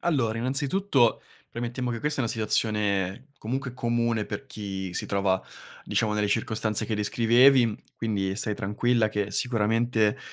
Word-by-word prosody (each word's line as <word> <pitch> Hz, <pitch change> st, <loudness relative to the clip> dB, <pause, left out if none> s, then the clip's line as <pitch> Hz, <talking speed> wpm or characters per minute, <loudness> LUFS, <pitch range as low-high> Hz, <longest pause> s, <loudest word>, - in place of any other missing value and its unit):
Allora, 125 Hz, -10 st, 0 dB
innanzitutto, 135 Hz, -, +1 dB, 0.3 s
premettiamo 120 Hz, +1 st, -3 dB
che 115 Hz, -, -3 dB
questa 150 Hz, 0 st, -1 dB
è -, -, +2 dB
una 115 Hz, -, -1 dB
situazione, 105 Hz, +1 st, 0 dB
comunque, 125 Hz, +3 st, -3 dB
comune 115 Hz, -3 st, 0 dB
per 135 Hz, -, -5 dB
chi 95 Hz, -6 st, -6 dB
si -, -, -3 dB
trova, 100 Hz, -1 st, +1 dB, 0.4 s
diciamo, 110 Hz, -1 st, 0 dB
nelle 105 Hz, 0 st, +1 dB
circostanze 110 Hz, -1 st, 0 dB
che 110 Hz, -, -2 dB
descrivevi, 115 Hz, +3 st, +4 dB, 0.2 s
quindi 100 Hz, -4 st, -1 dB
stai 105 Hz, -1 st, -1 dB
tranquilla 110 Hz, +2 st, +1 dB
che 105 Hz, -1 st, -2 dB
sicuramente, 115 Hz, -1 st, +1 dB
115 Hz, 140 wpm, -26 LUFS, 105-125 Hz, 0.4 s, descrivevi